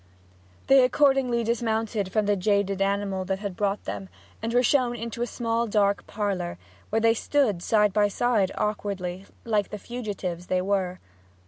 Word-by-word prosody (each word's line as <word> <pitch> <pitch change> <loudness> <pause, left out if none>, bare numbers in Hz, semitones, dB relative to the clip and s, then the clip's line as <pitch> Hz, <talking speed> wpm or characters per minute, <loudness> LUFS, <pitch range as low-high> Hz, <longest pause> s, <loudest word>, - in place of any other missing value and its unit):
They 270 -1 +6
accordingly 255 -2 +3
dismounted 225 -3 -1
from 215 0 +1
the 205 0 +2
jaded 200 0 +1
animal 195 -1 0
that 190 +1 -1
had 200 -2 -5
brought 200 +1 -1
them, 95 -1 -5 0.3
and 225 +1 -2
were 245 +1 +3
shown 250 -2 +2
into 235 0 -5
a 240 - 0
small 230 0 -1
dark 200 -1 +1
parlour, 195 -5 -2 0.3
where 220 - +1
they 225 0 +4
stood 230 -6 +1
side 210 0 +3
by 210 0 +4
side 205 -2 +1
awkwardly, 195 -3 -3 0.2
like 210 -3 +1
the 210 - -5
fugitives 200 -7 -5
they 185 - +1
were. 190 -2 0
210 Hz, 160 wpm, -26 LUFS, 195-230 Hz, 0.3 s, They